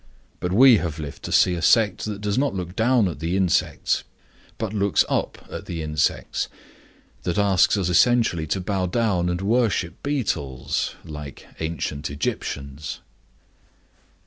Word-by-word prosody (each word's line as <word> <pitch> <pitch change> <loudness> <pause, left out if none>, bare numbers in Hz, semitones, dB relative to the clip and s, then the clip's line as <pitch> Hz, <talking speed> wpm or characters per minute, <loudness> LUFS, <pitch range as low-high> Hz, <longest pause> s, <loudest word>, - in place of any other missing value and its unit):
But 90 - -2
we 120 +4 +7
have 80 -5 -3
lived 75 -3 -7
to - - -5
see 90 - +4
a 85 - -3
sect 105 +1 +3
that 105 -2 -5
does 105 -1 -1
not 135 -4 +1
look 90 0 -5
down 120 -2 +3
at 85 - -5
the 85 +3 -1
insects, 95 -3 +1 0.5
but 110 -2 -3
looks 100 -2 +2
up - - -2
at - - -8
the 85 -2 -4
insects, 75 -1 -1 0.7
that 90 - -2
asks 100 0 +4
us 95 -3 0
essentially 90 -3 +3
to 95 - -1
bow 95 0 -1
down 95 -3 +1
and 90 +1 -2
worship 105 -4 0
beetles, 70 - -2
like 75 -3 -8
ancient 80 -2 -3
Egyptians. 70 0 -4
90 Hz, 145 wpm, -23 LUFS, 80-105 Hz, 0.7 s, we